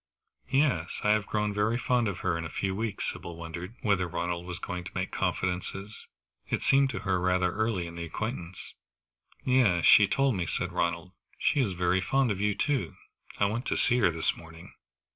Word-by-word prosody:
"Yes 135 - +1
I 105 - +4
have 105 -1 +2
grown 105 -1 0
very 105 +3 +1
fond 125 -1 +1
of 100 -3 -4
her 90 -2 0
in 85 - -3
a 80 - -5
few 95 +3 -2
weeks." 110 -1 -2
Sybil 85 - -8
wondered 85 +5 -7
whether 95 -4 +2
Ronald 85 +1 -3
was 90 -1 -5
going 90 -1 -5
to - - -7
make - - -2
confidences. 95 +3 -3 0.4
It - - -1
seemed 135 0 +4
to 125 - -3
her 95 -2 0
rather 90 0 +2
early 110 -3 -1
in 85 - -8
the 85 - -4
acquaintance. 90 -1 -5 0.7
"Yes, 115 -10 +3
she 100 - +8
told 135 +3 +2
me," 90 -2 -2
said - - -2
Ronald. 85 +1 -1 0.3
"She 150 - +1
is 105 -7 0
very 90 +1 +1
fond 135 +4 +2
of 100 -1 -2
you, 105 -1 +1
too; 145 -4 -1 0.4
I 100 - +4
went 115 +5 -2
to - - 0
see 125 -1 +3
her 100 - +4
this 80 0 0
morning." 80 0 -13
95 Hz, 200 wpm, -29 LUFS, 85-110 Hz, 0.7 s, she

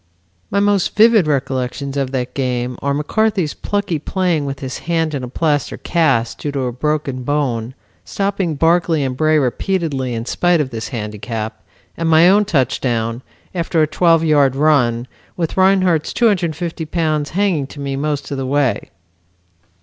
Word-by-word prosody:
"My 200 - +1
most 200 -2 +1
vivid 220 -5 +5
recollections 135 -1 -2
of 135 -2 -1
that 130 -1 -3
game 125 -2 -2
are 140 - 0
McCarthy's 190 +2 0
plucky 200 -6 -2
playing 175 -2 0
with 140 -1 -4
his 130 -1 -5
hand 165 -2 +1
in 140 - -2
a - - -4
plaster 145 +3 -1
cast, 135 -9 +1
due 145 - -3
to 140 - -1
a 125 -1 -1
broken 140 0 -2
bone, 125 -3 -1 0.3
stopping 195 -5 -2
Barclay 165 0 +2
and 130 -1 -2
Bray 155 +3 +3
repeatedly 140 -2 -1
in 115 0 -4
spite 175 +6 +2
of 140 -3 -1
this 115 -1 -5
handicap, 110 -1 -5 0.3
and 165 -1 -1
my 160 +2 +6
own 205 +3 +5
touchdown, 125 - 0 0.3
after 165 -2 +1
a - - +4
twelve 165 +1 +3
yard 145 -4 +3
run, 130 -5 +2 0.3
with 165 -3 -2
Rinehart's 185 -4 +3
250 175 -7 0
pounds 155 -3 -1
hanging 185 -9 +1
to 145 - -12
me 140 -1 -3
most 145 +1 -3
of 140 - -2
the 135 -1 -3
way." 140 -2 0
150 Hz, 160 wpm, -18 LUFS, 130-170 Hz, 0.3 s, my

